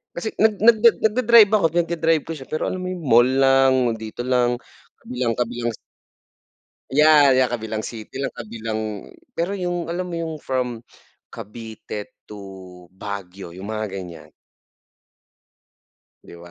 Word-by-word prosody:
Kasi 195 +6 -4
nag 220 -1 +4
nag 220 +1 +5 0.2
nag-da-drive 220 -1 +5
ako, 210 -5 +3
pinag-da-drive 165 -2 +1
ko 165 - -8
siya 135 -3 -11
pero 155 - -2
alam 185 - -4
mo 185 - -5
'yun 180 -2 -5
mall 120 -2 +5
lang, 135 -2 +3
dito 110 +2 -6
lang 125 -1 +1 0.5
kabilang-kabilang 120 -1 -2 1.2
yeah, 145 -2 +6
yeah, 130 - +4
kabilang 110 -2 -4
city 110 +1 -8
lang, 135 - -3
kabilang 110 -1 -5 0.6
pero 175 +4 -1
yung 175 -3 -3
alam 180 +1 -3
mo 170 - -5
yung 165 -1 -4
from 125 -4 -3 0.5
Cavite 110 -1 -9
to 95 -3 -12
Baguio 95 -2 -8
yung 95 +3 -9
mga 110 -2 -4
ganiyan? 90 -4 -9 1.9
'Di - - -13
ba? 85 0 -13
125 Hz, 135 wpm, -22 LUFS, 110-165 Hz, 1.9 s, yeah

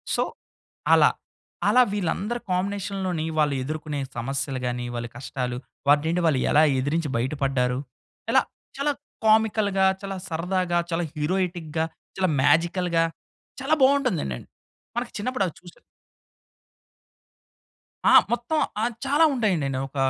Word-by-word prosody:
So - - +2 0.7
అలా. - - +7 0.6
అలా 250 - +6
వీళ్ళందరూ 205 +4 -1
కాంబినేషన్‌లోని 190 -2 -1
వాళ్ళు 145 -2 +2
ఎదుర్కొనే 150 +1 -4 0.2
సమస్యలు 135 +2 -2
గానీ, 125 0 -2
వాళ్ళ 120 0 -3
కష్టాలు 125 -1 -4 0.3
వాటినేంటి 160 +4 +3
వాళ్ళెలా 150 0 +4 0.2
ఎదిరించి 150 +3 -1
బయటపడ్డారు. 130 0 0 0.5
ఎలా - - +6 0.4
చాలా 290 +1 +1 0.3
కామికల్‌గా 215 -3 +3 0.2
చాలా 195 -1 -4
సరదాగా 175 +1 0
చాలా 170 +1 0
హీరోయిటిక్‌గా, 165 -1 -1 0.3
చాలా 185 -2 +2
మేజికల్‌గా 170 +2 +3 0.6
చాలా 295 +4 +2
బావుంటందండి. 190 - +2 0.6
మన 240 - 0 0.2
చిన్నప్పుడు 250 -2 0
అవి 165 - -7
చూసె 175 -1 -15 2.3
ఆ! - - +6 0.2
మొత్తం 240 +7 0 0.2
ఆహ్, 240 +2 0
చాలా 290 +4 +4
ఉంటాయండి. 195 - +1 0.2
ఒక 135 - -16
170 Hz, 105 wpm, -25 LUFS, 145-200 Hz, 2.3 s, అలా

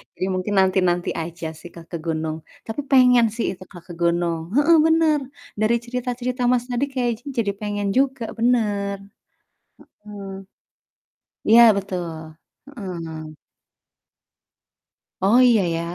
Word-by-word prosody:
jadi - - -2
mungkin 185 +3 -2
nanti-nanti 185 -2 +2
aja 165 0 -5
sih 175 - -11
Kak, 165 -1 -13
ke 170 - -3
gunung. 160 -1 -2 0.3
Tapi 225 +6 -3
pengen 250 -3 +6
sih 230 - -1
itu, 185 - -10
Kak, 175 -2 -12
ke - - -7
gunung. 170 -1 +1
Heeh, 320 +4 +5
bener, 320 -2 +3 0.4
dari 215 +2 +3
cerita-cerita 250 +1 -3
Mas 245 -1 +2
tadi 245 +3 0
kayaknya 245 -1 -3
jadi 205 -3 +1
pengen 205 -1 -2
juga 265 -2 +1 0.2
bener. 210 -4 +1 1.1
Heeh. 200 -2 -8 1.2
Iya 230 +2 +8 0.2
betul. 185 -3 -4 0.6
Heeh. 165 - -7 1.8
Oh 210 +6 +4
iya 240 -4 +5
ya. 165 - -2
205 Hz, 125 wpm, -22 LUFS, 175-250 Hz, 1.8 s, Iya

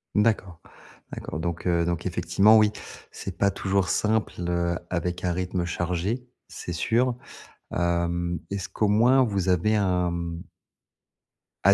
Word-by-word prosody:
D'accord. 105 -5 +1 0.5
D'accord. 80 - -5
Donc 85 +1 -3
heu 85 -1 +2
donc 85 0 -2
effectivement 95 +4 +4
oui 105 -1 +5 0.4
c'est 95 -1 -7
pas 100 0 +3
toujours 95 0 0
simple, 110 0 +1 0.2
heu, 85 0 0
avec 90 0 -2
un 90 - +1
rythme 90 0 -2
chargé, 90 +8 -2 0.2
c'est 85 - -6
sûr. 120 +8 +1 0.6
Hem, 85 0 0
est-ce 100 -2 -3
qu'au 105 - 0
moins 125 +5 +5
vous 100 -5 -1
avez 90 +5 +3
un, 90 -3 +1
mmh 85 0 -4 1.2
à 100 +1 +7
90 Hz, 140 wpm, -26 LUFS, 85-105 Hz, 1.2 s, à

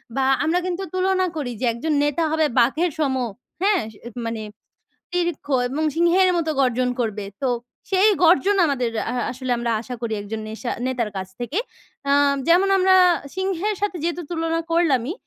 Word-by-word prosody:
বা 270 -1 +1 0.2
আমরা 330 +3 +2
কিন্তু 365 +1 -2
তুলনা 370 0 +1
করি 285 -6 -3
যে, 255 - -1
একজন 305 +7 -2
নেতা 295 +3 +1
হবে 315 0 +2
বাঘের 310 +9 +2
সম। 275 -3 +1 0.5
হ্যাঁ? 395 -3 +3 0.4
মানে 230 -1 -3 0.7
দীর্ঘ 345 -3 -1 0.2
এবং 285 +5 -2
সিংহের 345 +3 +4
মতো 320 -2 -1
গর্জন 250 0 +1
করবে। 215 -3 -2 0.2
তো 270 - +1 0.4
সেই 390 +2 +4
গর্জন 375 +4 +5
আমাদের 260 -6 0 0.2
আ - - -3 0.2
আসলে 255 0 -4
আমরা 235 0 -1
আশা 250 +1 -6
করি 230 -2 -2
১ - - -10
জন 220 - -3
নেশা 225 +3 -5 0.2
নেতার 245 -4 -1
কাছ 190 - -4
থেকে। 245 +8 -3 0.5
অ্যা 280 - +2 0.3
যেমন 360 +4 +4
আমরা 375 0 +5 0.4
সিংহের 380 +2 -1
সাথে 410 -3 -1
যেহেতু 345 +1 -1
তুলনা 330 0 -1
করলামই। 315 -5 +2
320 Hz, 165 wpm, -22 LUFS, 250-360 Hz, 0.7 s, গর্জন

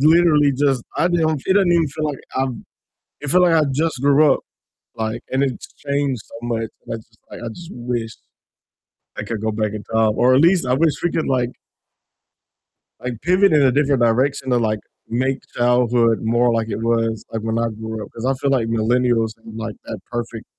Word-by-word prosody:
literally 155 -2 +5
just 135 -3 +1
I 170 - +2
didn't 160 -3 +1
fee 135 - -5
it - - 0
doesn't 195 -3 +4
even 165 -3 +3
feel 155 +3 -4
like 145 -2 -3 0.2
I've 130 -1 0 0.7
it 145 - -4
feel 180 - +5
like 175 -2 +4
I 155 - +4
just 155 0 -1
grew 145 +1 +5
up, - - -5 0.5
like, 110 +1 -3
and 130 - +1
it's 130 -4 -3 0.2
changed 140 -4 0
so - - -14
much, 115 -2 -2 0.2
and - - -5
I - - -5
just 115 +1 -18
like, - - -8
I 120 - -5
just 170 +9 -10
wish 120 -2 -3 1.1
I - - -3
could 115 - -4
go 110 0 0
back 105 -1 -2
in 105 -1 -6
time, 110 -1 +1
or 125 +1 +4
at 135 - +5
least 170 -3 +4
I 125 - +1
wish 155 +2 +3
we 175 - +1
could, 160 - -1
like 125 -2 +1 1.5
like, 125 0 -4
pivot 185 +2 +4
in 150 - +5
a 130 -2 +5
different 140 -1 +2
direction 130 +4 +1
to, 125 - +3
like, 110 -2 0 0.3
make 130 +3 0 0.2
childhood 120 -1 +3
more 120 +1 +2
like 115 -1 -1
it 105 - -2
was, 115 -1 0
like, 110 - -3
when 110 +1 -2
I 115 - +1
grew 110 0 -6
up, - - -10
'cause 115 - -6
I 135 - +2
feel 135 +1 -1
like 125 -4 +1
millennials 115 0 +1
had, 110 0 -12
like, 115 -1 -5
that - - -6
perfect 115 -2 -5
125 Hz, 215 wpm, -20 LUFS, 115-145 Hz, 1.5 s, literally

